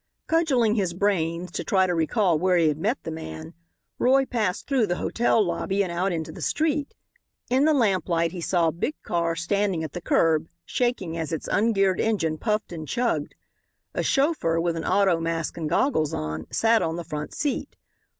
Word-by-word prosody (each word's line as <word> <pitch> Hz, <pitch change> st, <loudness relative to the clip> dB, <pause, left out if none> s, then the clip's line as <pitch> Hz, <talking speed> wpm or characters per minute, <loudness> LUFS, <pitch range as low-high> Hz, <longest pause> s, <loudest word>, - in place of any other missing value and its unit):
Cudgelling 275 Hz, -10 st, +2 dB
his 190 Hz, -6 st, -1 dB
brains 180 Hz, -3 st, 0 dB
to -, -, -4 dB
try 190 Hz, -1 st, +3 dB
to 180 Hz, -, 0 dB
recall 170 Hz, +1 st, +2 dB
where 180 Hz, +1 st, +3 dB
he 165 Hz, -2 st, +4 dB
had 150 Hz, 0 st, -2 dB
met 220 Hz, +10 st, 0 dB
the 160 Hz, -, -5 dB
man, 80 Hz, -, -7 dB, 0.5 s
Roy 270 Hz, +2 st, +4 dB
passed 215 Hz, -8 st, -1 dB
through 260 Hz, -6 st, +1 dB
the 175 Hz, -, 0 dB
hotel 225 Hz, +1 st, +1 dB
lobby 195 Hz, +3 st, 0 dB
and 180 Hz, -, -4 dB
out 180 Hz, +3 st, 0 dB
into 160 Hz, -2 st, -3 dB
the -, -, -10 dB
street. 300 Hz, -2 st, -1 dB, 0.6 s
In 265 Hz, +3 st, +4 dB
the 315 Hz, -, +4 dB
lamplight 180 Hz, -, +1 dB
he 180 Hz, -1 st, -6 dB
saw 170 Hz, -1 st, +2 dB
a -, -, -2 dB
big 215 Hz, -, -3 dB
car 170 Hz, -1 st, 0 dB
standing 185 Hz, 0 st, 0 dB
at 155 Hz, -, -6 dB
the 175 Hz, -, -5 dB
curb, 160 Hz, -1 st, +2 dB, 0.2 s
shaking 220 Hz, -10 st, -1 dB
as 160 Hz, -2 st, -3 dB
its 160 Hz, -, -3 dB
ungeared 195 Hz, -3 st, +2 dB
engine 165 Hz, -8 st, 0 dB
puffed 215 Hz, -3 st, -1 dB
and 160 Hz, -3 st, -6 dB
chugged. 235 Hz, -, -1 dB, 0.6 s
A -, -, -1 dB
chauffeur, 270 Hz, -, +1 dB
with 170 Hz, 0 st, 0 dB
an 165 Hz, -, -4 dB
auto 190 Hz, -4 st, +3 dB
mask 165 Hz, -1 st, -2 dB
and 160 Hz, -3 st, -3 dB
goggles 170 Hz, -, +1 dB
on, 80 Hz, +1 st, -4 dB
sat 225 Hz, 0 st, +3 dB
on 160 Hz, 0 st, -1 dB
the 175 Hz, -, -4 dB
front 150 Hz, -2 st, -6 dB
seat. 290 Hz, -2 st, -2 dB
180 Hz, 190 wpm, -25 LUFS, 165-225 Hz, 0.6 s, he